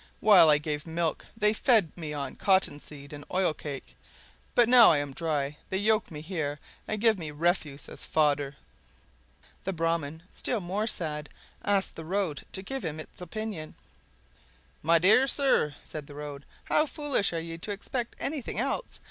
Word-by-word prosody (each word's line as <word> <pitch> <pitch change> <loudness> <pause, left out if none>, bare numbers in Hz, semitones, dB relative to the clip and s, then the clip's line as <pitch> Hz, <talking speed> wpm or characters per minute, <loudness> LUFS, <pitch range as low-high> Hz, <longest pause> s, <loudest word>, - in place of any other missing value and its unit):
While 205 -7 +7
I 150 - +6
gave 150 +1 -4
milk 165 -1 -2
they 210 -1 +3
fed 220 - +2
me 160 -3 -5
on 140 -3 -4
cottonseed 150 -6 0
and 145 0 -8
oil 185 -3 +2
cake, 145 -2 -8 0.6
but 240 -2 +6
now 240 -1 +8
I 155 - +3
am 145 -1 -3
dry 150 -2 -1
they 190 - -1
yoke 215 +2 +2
me 150 -2 -7
here, 155 -4 -3 0.3
and 215 - -2
give 220 -2 +3
me 160 -3 -5
refuse 150 -2 0
as - - -7
fodder!" 145 -2 +1 1.1
The 195 - -2
Brahman, 165 -2 -1
still 240 - -1
more 195 +4 -2
sad, 150 -7 -2 0.3
asked 200 -1 +1
the 165 - -7
Road 180 -3 -2
to 190 - -3
give 270 +6 -4
him 155 -1 -4
its 155 - -9
opinion. 180 -3 -5 1.1
"My 165 +2 +5
dear 205 +10 +6
sir," 270 - +3
said 150 -2 -7
the 145 - -11
Road, 145 -1 -7 0.2
"how 305 - +3
foolish 290 -8 0
you 165 0 -4
are - - -6
to 205 - -5
expect 235 +4 -4
anything 280 -3 -3
else! - - -2
165 Hz, 170 wpm, -28 LUFS, 150-205 Hz, 1.1 s, now